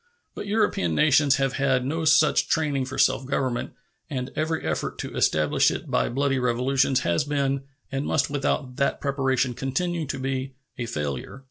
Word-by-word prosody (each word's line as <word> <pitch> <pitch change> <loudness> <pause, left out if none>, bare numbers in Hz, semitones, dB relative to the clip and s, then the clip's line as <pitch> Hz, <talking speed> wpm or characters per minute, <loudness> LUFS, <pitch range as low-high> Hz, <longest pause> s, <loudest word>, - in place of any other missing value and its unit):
But - - -7
European 200 - +1
nations 145 - +4
have 135 -1 0
had 130 -2 +2
no 160 +4 -2
such 155 0 +4
training 145 -4 0
for 130 - -7
self - - +3
government, 130 -3 -1 0.4
and 130 -4 -4
every 160 +1 -1
effort - - -2
to - - -6
establish 75 -1 +3
it - - -5
by - - +1
bloody 135 +1 0
revolutions 130 +2 +1
has 85 - +1
been, 140 -2 -1 0.3
and 135 +1 -2
must 140 -3 +1
without 135 -2 -2
that 140 -1 +1
preparation 135 -2 0
continue 160 +6 -2
to 135 - -3
be, 130 0 -3 0.2
a 120 -4 -4
failure. 75 - -4
135 Hz, 165 wpm, -25 LUFS, 130-145 Hz, 0.4 s, nations